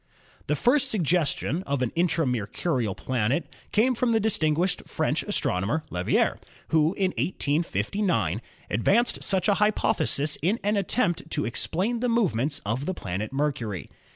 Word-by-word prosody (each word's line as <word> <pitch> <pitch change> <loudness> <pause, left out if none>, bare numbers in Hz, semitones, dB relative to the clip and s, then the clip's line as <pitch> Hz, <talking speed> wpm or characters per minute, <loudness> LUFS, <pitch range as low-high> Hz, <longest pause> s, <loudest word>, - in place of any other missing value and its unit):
The 150 - +1
first 265 - +3
suggestion 170 - +1
of 140 -2 0
an 120 - -1
intra 170 -1 +1
Mercurial 120 - -1
planet 130 +5 0 0.3
came 240 +4 +3
from 240 0 +1
the 225 - +3
distinguished 175 -4 +1
French - - 0
astronomer, 100 - -1
Leverrier, 90 0 +1 0.3
who 160 +3 +3
in 190 -2 +1
1859 150 - 0 0.3
advanced 200 - +2
such 190 -1 0
a 205 - +5
hypothesis 155 -8 +2
in 195 - +1
an 205 +1 +1
attempt 200 -2 0
to 150 - -1
explain 190 - 0
the 250 +1 0
movements 155 - +1
of 115 +7 -2
the 185 - -1
planet 100 - -4
Mercury. 135 - -2
160 Hz, 140 wpm, -26 LUFS, 125-200 Hz, 0.3 s, a